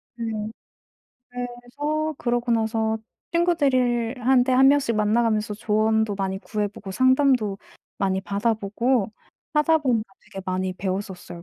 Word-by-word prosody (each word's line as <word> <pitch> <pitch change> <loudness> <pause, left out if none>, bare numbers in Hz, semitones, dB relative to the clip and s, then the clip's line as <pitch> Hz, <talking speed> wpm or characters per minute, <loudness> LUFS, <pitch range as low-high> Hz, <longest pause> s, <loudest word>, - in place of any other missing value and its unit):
네. 235 - -4 1.1
그래서 245 +6 -3
그러고 240 0 -1
나서 220 -1 0 0.3
친구들을 265 -9 +2
한테 260 -1 +4
1 265 +1 +6
명씩 280 -5 +3
만나 215 +3 +2
가면서 215 -2 0
조언도 220 0 +1
많이 190 -1 -2
구해 210 0 -2
보고 195 -1 -10
상담도 255 -3 +3 0.4
많이 190 -1 0
받아 200 +4 0
보고 220 +2 0 0.4
하다 315 +2 +4
보니까 230 -8 -1
되게 195 -2 -9
많이 185 0 -1
배웠었어요 185 -2 -5
230 Hz, 285 characters per minute, -24 LUFS, 205-255 Hz, 1.1 s, 1